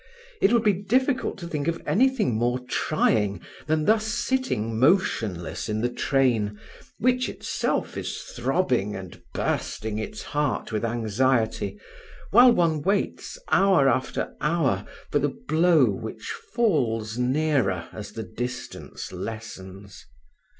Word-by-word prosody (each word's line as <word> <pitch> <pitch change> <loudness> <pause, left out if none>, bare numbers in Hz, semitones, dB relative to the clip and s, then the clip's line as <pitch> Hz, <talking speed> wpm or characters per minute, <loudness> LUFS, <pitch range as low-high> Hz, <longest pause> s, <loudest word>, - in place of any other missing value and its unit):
It 200 - +5
would 235 -2 +3
be 210 -2 +4
difficult 250 +8 0
to 175 -3 -7
think 150 -3 -3
of 170 0 0
anything 255 - +2
more 120 +3 +1
trying 115 - 0 0.3
than 155 0 +1
thus 220 0 +3
sitting 215 - -1
motionless 115 - +1
in 110 0 -1
the 120 - +1
train, 115 -7 +1 0.4
which 255 +2 +2
itself - - -2
is - - -4
throbbing 125 - -1
and 95 -2 -9
bursting 110 0 -2
its 210 - -5
heart 145 -4 -1
with 110 0 -2
anxiety, 110 -2 0 0.5
while 245 +4 +8
one 165 -8 +2
waits 200 - -1
hour 190 -8 +5
after 130 0 0
hour 160 -2 +1 0.2
for - - +3
the - - +1 0.2
blow 160 -2 +5
which 110 +2 -6 0.2
falls 125 - +1
nearer 125 - +1
as 105 -1 -8
the 110 - -5
distance 125 +5 -6
lessens. 100 -3 -8
130 Hz, 125 wpm, -25 LUFS, 110-185 Hz, 0.5 s, while